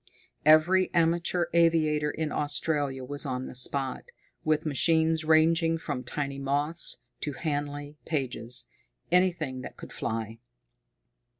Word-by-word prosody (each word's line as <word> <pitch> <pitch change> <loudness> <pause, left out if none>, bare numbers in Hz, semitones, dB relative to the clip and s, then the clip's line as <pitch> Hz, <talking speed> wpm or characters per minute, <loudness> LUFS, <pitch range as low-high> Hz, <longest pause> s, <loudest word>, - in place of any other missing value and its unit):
Every 175 +5 +5
amateur 170 +1 +2
aviator 155 -3 +3
in 155 0 -3
Australia 145 -2 -1
was 145 +2 -4
on 130 -3 -3
the - - -8
spot, 130 +1 0 0.4
with 155 0 +1
machines 160 +2 +2
ranging 165 +1 +3
from 125 -5 -4
tiny 140 +2 -4
Moths 145 +4 -1 0.2
to 145 - -4
Handley 145 0 -4
Pages 125 -5 0 0.5
anything 170 -8 +1
that - - -9
could - - -10
fly. 115 0 -4
150 Hz, 115 wpm, -28 LUFS, 140-165 Hz, 0.5 s, Every